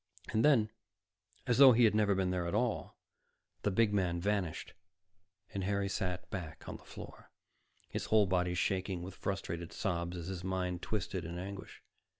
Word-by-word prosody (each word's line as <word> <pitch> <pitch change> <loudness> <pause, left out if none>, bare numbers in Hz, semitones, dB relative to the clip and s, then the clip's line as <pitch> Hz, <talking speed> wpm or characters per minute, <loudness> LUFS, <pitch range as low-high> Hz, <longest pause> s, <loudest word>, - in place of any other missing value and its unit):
And 110 - +2
then, 115 -8 +5 0.7
as 120 +1 +2
though 135 -2 +10
he 120 +1 +5
had 110 - +6
never 105 -2 +3
been 95 -1 +1
there 90 -2 -1
at 85 - -1
all, - - -1 0.6
the - - +1
big 105 +2 +3
man 90 -4 +1
vanished, 95 -3 -1 0.8
and 100 -2 -2
Harry 100 +1 0
sat 90 -2 -2
back 90 -5 -6
on - - -5
the - - -19
floor, - - -11 0.6
his - - -4
whole 110 -1 +5
body 90 -1 +1
shaking 95 -1 -1
with 95 +1 -7
frustrated 85 -4 -4
sobs 85 -3 -2
as 85 - -5
his 90 -1 -5
mind 90 -1 -2
twisted 95 -4 -2
in 85 +2 -5
anguish. 95 +2 -7
95 Hz, 170 wpm, -33 LUFS, 90-105 Hz, 0.8 s, though